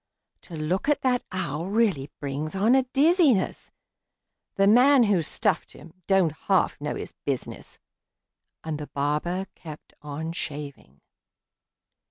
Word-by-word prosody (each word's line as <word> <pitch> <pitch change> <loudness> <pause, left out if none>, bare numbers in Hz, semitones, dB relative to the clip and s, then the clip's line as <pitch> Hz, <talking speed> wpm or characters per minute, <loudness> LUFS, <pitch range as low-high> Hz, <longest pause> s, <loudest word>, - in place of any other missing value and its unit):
To 170 - -11
look 170 - -1
at 295 - +2
that 250 -2 +2
owl 170 -3 -3
really 195 -10 +1
brings 145 +4 -4
on 210 +5 +3
a 265 - +5
dizziness; 295 - +3 0.9
The 195 - +3
man 250 +5 +6
who 205 -5 +2
stuffed 155 - -1
him 165 - -14
don't 190 -5 +3
half 180 +1 0
know 150 - -3
his - - -7
business!" 135 -3 -4 0.9
And 155 -2 -4
the 150 - -6
barber 150 +6 -1
kept 155 -3 -11
on 150 +2 -5
shaving. 140 - -7
170 Hz, 130 wpm, -25 LUFS, 150-210 Hz, 0.9 s, man